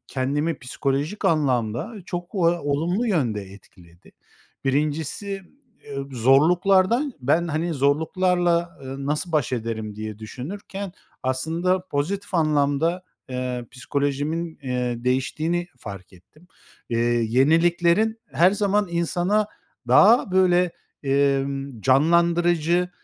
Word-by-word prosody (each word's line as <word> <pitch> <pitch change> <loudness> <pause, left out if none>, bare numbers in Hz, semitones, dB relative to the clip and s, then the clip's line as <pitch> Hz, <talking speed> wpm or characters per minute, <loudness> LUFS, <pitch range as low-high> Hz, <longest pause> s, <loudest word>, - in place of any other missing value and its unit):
kendimi 145 +4 -1
psikolojik 140 +7 -2
anlamda 130 - +1
çok 175 +2 -6
o - - -2 0.2
olumlu 165 +9 -1
yönde 125 - 0
etkiledi. 95 -3 -17 0.5
Birincisi, 155 +8 -1 0.4
eee, 140 - -8
zorluklardan 180 - +3
ben, 160 +7 +1
hani, 160 +2 -1
zorluklarla, 170 +4 +1
ııı, 135 +1 -6
nasıl 150 +4 -2
baş 150 -5 +1
ederim 110 -3 -3
diye 110 -1 -6
düşünürken 185 - -7 0.3
aslında 165 +8 0
pozitif 185 +6 -3
anlamda, 155 +2 +1 0.3
eee, 125 -1 -3
psikolojimin, 145 +5 -2
eee, 125 -2 -2
değiştiğini 155 +7 0
fark 100 -5 -9
ettim. 120 - -21 0.4
Eee, 115 - -1 0.3
yeniliklerin 170 - +3
her 175 +3 +5
zaman 205 0 +1
insana 175 +5 +1 0.4
daha 220 0 +6
böyle, 180 -2 +3 0.3
emm, 135 -2 0
canlandırıcı, 170 +5 +3
155 Hz, 100 wpm, -23 LUFS, 130-175 Hz, 0.5 s, daha